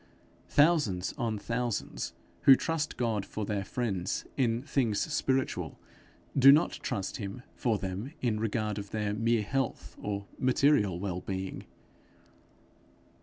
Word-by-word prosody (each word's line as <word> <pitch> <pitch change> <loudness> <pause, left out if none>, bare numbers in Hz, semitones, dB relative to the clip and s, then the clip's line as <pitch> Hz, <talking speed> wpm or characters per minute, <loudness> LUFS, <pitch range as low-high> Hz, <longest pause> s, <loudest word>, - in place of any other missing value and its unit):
Thousands 145 - +3
on 115 -2 -1
thousands 115 +1 -3 0.3
who 135 - +10
trust 160 +1 -2
God 115 -5 0
for 105 +2 -4
their 100 -1 -1
friends 95 -4 -2
in 120 -2 +1
things 125 -8 +1
spiritual, 135 -4 -1 0.6
do 135 0 +9
not 155 +4 +4
trust 95 -2 -3
him 105 +4 -6
for 115 -4 0
them 100 +7 -4
in 115 -4 0
regard 110 -1 -1
of 100 0 -7
their 105 -1 -1
mere 115 +1 +2
health 105 -8 -2
or 100 -1 -3
material 130 - +3
well 90 -2 -3
being. 95 0 -4
110 Hz, 125 wpm, -30 LUFS, 100-130 Hz, 0.6 s, who